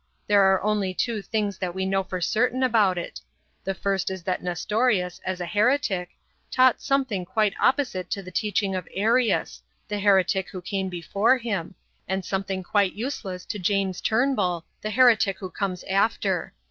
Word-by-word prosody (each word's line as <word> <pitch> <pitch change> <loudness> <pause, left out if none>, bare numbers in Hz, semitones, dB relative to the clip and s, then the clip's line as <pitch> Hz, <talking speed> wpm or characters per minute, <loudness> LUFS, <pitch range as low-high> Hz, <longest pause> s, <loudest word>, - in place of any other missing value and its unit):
There 200 -2 +5
are 190 - +1
only 205 -3 0
two 230 -1 -1
things 205 -2 -2
that 180 -2 -3
we 190 0 -1
know 195 0 +1
for 185 -1 -5
certain 245 +8 +1
about 215 -7 +3
it. 175 - -6 0.4
The 195 - -2
first 195 -1 -1
is 190 -2 -6
that 185 +1 -2
Nestorius, 180 +1 0
as 185 -1 -3
a 175 - -3
heretic, 205 -2 +1 0.4
taught 255 -1 +4
something 260 -9 0
quite 210 +2 +1
opposite 245 -10 +1
to 195 - -3
the 185 - -10
teaching 200 0 0
of 185 -1 -4
Arius, 225 +4 +1 0.3
the 210 -1 -3
heretic 190 -1 +3
who 185 - -7
came 190 +1 -3
before 200 +8 +1
him, 200 -7 -4 0.3
and 190 0 -2
something 190 -1 -2
quite 200 0 +1
useless 200 -6 -5
to 210 - -5
James 190 0 0
Turnbull, 215 -8 +1 0.2
the 215 - -3
heretic 220 -4 +4
who 185 -3 -7
comes 190 -3 -3
after. 195 -1 0
195 Hz, 170 wpm, -25 LUFS, 185-220 Hz, 0.4 s, There